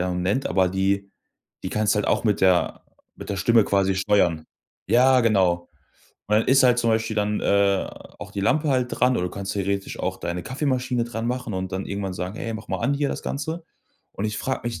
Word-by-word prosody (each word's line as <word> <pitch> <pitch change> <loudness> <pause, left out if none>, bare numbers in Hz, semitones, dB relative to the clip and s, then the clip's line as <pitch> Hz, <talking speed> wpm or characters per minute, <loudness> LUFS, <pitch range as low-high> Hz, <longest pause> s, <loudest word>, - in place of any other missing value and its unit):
äh, 90 0 0
nennt, 95 +9 0
aber 95 -1 +2
die 100 +1 0 0.5
die - - -3
kannst 105 -1 +1
du - - -3
halt 105 - -1
auch - - +1
mit 105 -3 +1
der 90 -2 +2 0.3
mit - - -9
der 100 - -2
Stimme 110 +4 +4
quasi 95 -1 +1
steuern. 95 -5 +1 0.4
Ja, 130 +1 +5
genau. 95 -7 +2 0.6
Und 105 - +3
dann 110 - -1
ist 135 0 +5
halt 125 -1 +4
zum 115 -1 +2
Beispiel 110 0 0
dann, 105 0 0
äh, 100 -1 +2 0.3
auch - - -9
die 100 - -3
Lampe 150 +10 +1
halt 130 -3 +2
dran 125 0 +2
oder 90 - 0
du - - -6
kannst 100 0 -5
theoretisch 100 0 -2
auch - - -2
deine 85 +1 -4
Kaffeemaschine 130 -3 -1
dran 115 -1 -4
machen 125 -2 -3
und 95 0 -4
dann 95 +1 -3
irgendwann 100 -2 -4
sagen: 90 +3 -5
„Hey, 115 0 -4
mach 110 0 -8
mal - - -2
an 140 - 0
hier 140 0 0
das - - -4
Ganze.“ 160 +4 -4 0.5
Und 100 - -5
ich 105 0 -2
frage 130 - -2
mich 120 -6 -4
105 Hz, 225 wpm, -24 LUFS, 95-125 Hz, 0.6 s, Ja